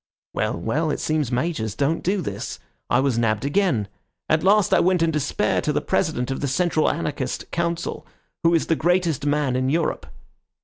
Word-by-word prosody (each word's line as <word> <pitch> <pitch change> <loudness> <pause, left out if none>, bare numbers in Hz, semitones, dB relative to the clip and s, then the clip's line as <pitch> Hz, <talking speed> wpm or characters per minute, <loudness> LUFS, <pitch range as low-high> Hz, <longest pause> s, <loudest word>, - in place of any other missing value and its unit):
Well, - - -1
well, 145 - -1
it - - -1
seems 155 -5 0
majors 120 -5 -1
don't 145 +5 0
do 190 +2 0
this. - - -5 0.3
I - - +3
was 130 -3 +1
nabbed 110 +1 +1
again. 145 - +1 0.4
At 155 0 +3
last 200 +1 +4
I - - +6
went 180 -1 +3
in 165 - +2
despair 150 -3 0
to - - 0
the - - +1
President 125 +2 -1
of 135 - -3
the 140 - -1
Central 160 +3 +2
Anarchist 145 -6 -3
Council, 170 0 -2 0.3
who 170 0 +4
is 165 - +1
the 165 - +1
greatest 170 -4 +1
man 145 -3 +1
in 130 +1 +1
Europe." 160 +3 -1
155 Hz, 185 wpm, -23 LUFS, 130-170 Hz, 0.4 s, I